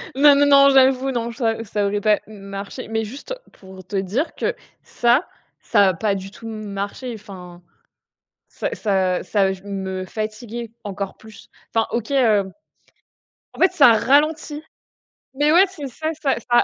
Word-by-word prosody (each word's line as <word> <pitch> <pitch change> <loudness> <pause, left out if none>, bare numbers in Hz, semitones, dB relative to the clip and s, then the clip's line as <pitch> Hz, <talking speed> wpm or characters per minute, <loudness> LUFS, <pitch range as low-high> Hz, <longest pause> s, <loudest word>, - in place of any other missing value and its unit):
Non, 285 +1 +7
non, 285 0 +4
non, 280 0 +7
j'avoue 265 0 +4
non, 235 -2 -2
ça 225 -2 -1
ça 205 -1 -2
aurait 205 +1 -1
pas 210 0 +3
m 215 -2 -12
marché, 195 +1 -7
mais 225 0 -1
juste, 270 - -7 0.2
pour 190 -1 -14
te 200 - -7
dire 200 - -1
que - - -1 0.3
ça, 245 +7 +2 0.3
ça 200 -2 +4
a - - 0
pas 205 +4 0
du 195 0 -6
tout 225 - -11
m 215 -1 -6
marché, 200 +5 -5
enfin, 180 -4 -11 0.9
ça - - -4
ça 190 -3 0
ça 195 -2 +1
j 190 0 -10
me 190 -2 -4
fatiguait 220 +3 -6
encore 200 -1 -5
plus. 220 -1 -15 0.3
Enfin, 225 -1 +2
OK, 235 +3 -3
heu, 215 -8 +3 1.0
en - - -13
fait, 370 -1 +5
ça 285 -10 +6
ralentit. 295 +5 +2 0.7
Mais 290 +3 +2
ouais, 365 +4 +7
c'est 305 -7 -7
ça, 310 +5 -4
ça 275 -3 +2 0.2
ça 240 - +6
225 Hz, 170 wpm, -21 LUFS, 200-270 Hz, 1.0 s, Non